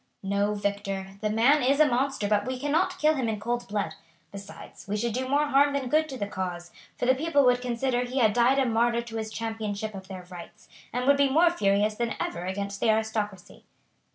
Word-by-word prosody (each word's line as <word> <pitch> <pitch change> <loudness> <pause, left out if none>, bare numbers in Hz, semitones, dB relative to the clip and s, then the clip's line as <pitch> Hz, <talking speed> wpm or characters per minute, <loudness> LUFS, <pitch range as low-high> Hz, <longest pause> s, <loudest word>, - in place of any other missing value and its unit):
"No, 200 +2 0
Victor; 195 -1 -3
the 215 - 0
man 240 +8 +4
is 275 +3 +2
a 310 - +7
monster, 265 -4 0
but 205 +2 +1
we 255 -1 -3
cannot 290 +6 0
kill 305 +1 +3
him 260 -6 -1
in 215 -2 -3
cold 240 +3 -3
blood; 200 -5 -2 0.4
besides, 200 0 -11
we 205 +1 -1
should 230 +1 -1
do 255 +2 -2
more 290 +2 +3
harm 285 +1 +4
than 270 -3 -2
good 310 +2 +2
to 265 - -6
the 205 - -2
cause, 180 -3 -5 0.3
for - - -1
the 260 - +5
people 285 0 +2
would 250 0 +3
consider 245 0 -1
he 250 +2 -5
had 220 -5 +4
died 245 +4 +3
a 270 - +3
martyr 235 0 +1
to 230 -1 -7
his 220 -1 -4
championship 220 -2 -4
of 190 -1 -9
their 185 -2 -8
rights, 175 -1 -12 0.2
and 250 +1 -2
would 280 +1 +5
be 280 -1 +3
more 335 +5 +4
furious 205 -7 +1
than 235 +1 -2
ever 175 +1 -3
against 200 +1 -4
the 230 - +1
aristocracy." 215 -3 -2
230 Hz, 220 wpm, -27 LUFS, 205-260 Hz, 0.4 s, a